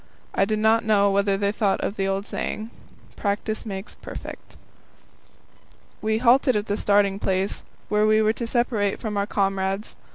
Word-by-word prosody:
I 195 Hz, -, +3 dB
do 215 Hz, +2 st, 0 dB
not 220 Hz, +2 st, +3 dB
know 200 Hz, -2 st, +3 dB
whether 200 Hz, 0 st, +2 dB
they 200 Hz, 0 st, +1 dB
thought 205 Hz, -2 st, +1 dB
of 200 Hz, -, -2 dB
the 195 Hz, -2 st, -1 dB
old 195 Hz, +1 st, -1 dB
saying: 220 Hz, +1 st, -4 dB, 0.4 s
Practice 215 Hz, +2 st, -2 dB
makes 195 Hz, 0 st, -6 dB
perfect. -, -, -10 dB, 1.4 s
We 220 Hz, 0 st, +1 dB
halted 255 Hz, +2 st, +4 dB
at 210 Hz, 0 st, 0 dB
the 205 Hz, -, -1 dB
starting 200 Hz, -1 st, +2 dB
place, 190 Hz, 0 st, -1 dB, 0.3 s
where 210 Hz, 0 st, +2 dB
we 215 Hz, 0 st, +4 dB
were 215 Hz, 0 st, +3 dB
to 235 Hz, 0 st, -4 dB
separate 230 Hz, -4 st, 0 dB
from 215 Hz, -3 st, -4 dB
our 200 Hz, 0 st, 0 dB
comrades. 195 Hz, 0 st, -1 dB
205 Hz, 165 wpm, -24 LUFS, 195-220 Hz, 1.4 s, halted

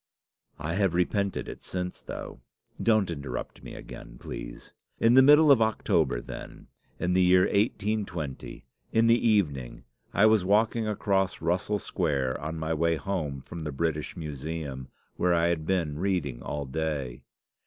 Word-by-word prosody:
"I 75 Hz, +2 st, -3 dB
have 95 Hz, -2 st, +1 dB
repented 100 Hz, +2 st, 0 dB
it -, -, -8 dB
since, 90 Hz, 0 st, -4 dB
though. -, -, -7 dB, 0.4 s
Don't 110 Hz, -5 st, +3 dB
interrupt 70 Hz, -4 st, -6 dB
me -, -, -9 dB
again, -, -, -10 dB
please. -, -, -8 dB, 0.3 s
In 115 Hz, +1 st, +5 dB
the 130 Hz, -, +8 dB
middle 150 Hz, +2 st, +7 dB
of 130 Hz, -5 st, +6 dB
October, 110 Hz, -, +1 dB
then, -, -, -10 dB, 0.3 s
in 90 Hz, +1 st, 0 dB
the 95 Hz, -, +4 dB
year 90 Hz, 0 st, +6 dB
1820, 100 Hz, -, -1 dB, 0.3 s
in 115 Hz, +1 st, +3 dB
the 115 Hz, +1 st, +4 dB
evening, 75 Hz, -, 0 dB, 0.3 s
I 100 Hz, -, +4 dB
was 110 Hz, -3 st, +5 dB
walking 110 Hz, +3 st, +2 dB
across 100 Hz, -3 st, 0 dB
Russell 90 Hz, +5 st, 0 dB
Square, 70 Hz, -8 st, -1 dB
on 80 Hz, +2 st, -4 dB
my 80 Hz, 0 st, -2 dB
way 85 Hz, +1 st, +2 dB
home 80 Hz, -6 st, -3 dB
from 85 Hz, +5 st, -9 dB
the 75 Hz, -2 st, -4 dB
British 75 Hz, +4 st, -2 dB
Museum, 75 Hz, -3 st, -5 dB, 0.3 s
where 90 Hz, -1 st, +2 dB
I 85 Hz, 0 st, +3 dB
had 80 Hz, -2 st, -2 dB
been 80 Hz, -6 st, 0 dB
reading 85 Hz, -10 st, -1 dB
all 75 Hz, +2 st, -4 dB
day. 70 Hz, -3 st, -3 dB
85 Hz, 155 wpm, -28 LUFS, 75-100 Hz, 0.4 s, the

